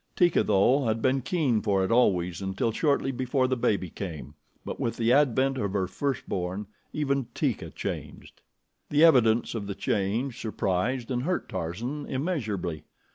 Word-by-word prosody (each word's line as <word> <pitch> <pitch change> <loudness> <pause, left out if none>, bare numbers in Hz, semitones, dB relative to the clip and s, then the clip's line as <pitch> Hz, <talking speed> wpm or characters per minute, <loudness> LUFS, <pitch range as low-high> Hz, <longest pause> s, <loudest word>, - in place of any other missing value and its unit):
Teeka, 175 -2 +4
though, 125 +8 +3
had 110 0 +1
been 130 +3 +2
keen 130 -5 +1
for 95 -3 +1
it 95 - -3
always 90 -7 +2
until 95 +4 -1
shortly 140 +2 +1
before 130 +1 0
the 130 - +1
baby 105 -8 0
came; 75 -8 -6 0.3
but - - -5
with 115 - -2
the 115 +1 +3
advent 135 -1 +3
of 100 -3 -2
her 95 -2 +1
first 135 +8 -3
born, 95 +2 -3 0.3
even 140 -4 -1
Teeka - - -1
changed. - - -7 0.5
The 150 +2 +4
evidence 120 -7 +4
of 105 -4 -4
the 100 - -4
change 115 +6 -1
surprised 115 +4 -1
and 125 -1 0
hurt 180 +7 -1
Tarzan 110 - -4
immeasurably. 110 - -2
115 Hz, 160 wpm, -27 LUFS, 95-135 Hz, 0.5 s, Teeka